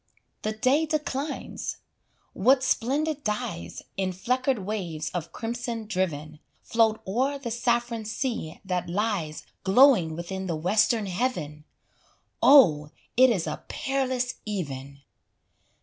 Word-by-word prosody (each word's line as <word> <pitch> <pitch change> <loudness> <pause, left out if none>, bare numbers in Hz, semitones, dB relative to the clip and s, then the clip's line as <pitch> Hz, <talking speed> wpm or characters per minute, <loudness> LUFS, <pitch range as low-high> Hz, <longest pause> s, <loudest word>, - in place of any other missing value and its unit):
The 215 - -2
day 265 +8 +2
declines; 295 -1 -3 0.6
what 255 +6 +4
splendid 290 +5 0
dyes, 150 - -3
In 190 -1 0
fleckered 250 +2 0
waves 175 -7 -3
of 170 -2 -4
crimson 235 +1 -4
driven, 155 -7 -2 0.2
Float 225 -1 +2
o'er 260 +8 0
the 255 -4 -5
saffron 235 -1 0
sea 225 - -3
that 180 -2 -2
lies 185 -5 -1 0.2
Glowing 195 - +5
within 190 +3 -5
the 170 - -1
western 210 +6 +2
heaven! 175 - -2 0.8
Oh, 160 - +7 0.3
it 255 +1 +7
is 190 -8 0
a 155 - -5
peerless 260 -2 -1
even! 140 -9 -5
215 Hz, 115 wpm, -26 LUFS, 175-255 Hz, 0.8 s, Oh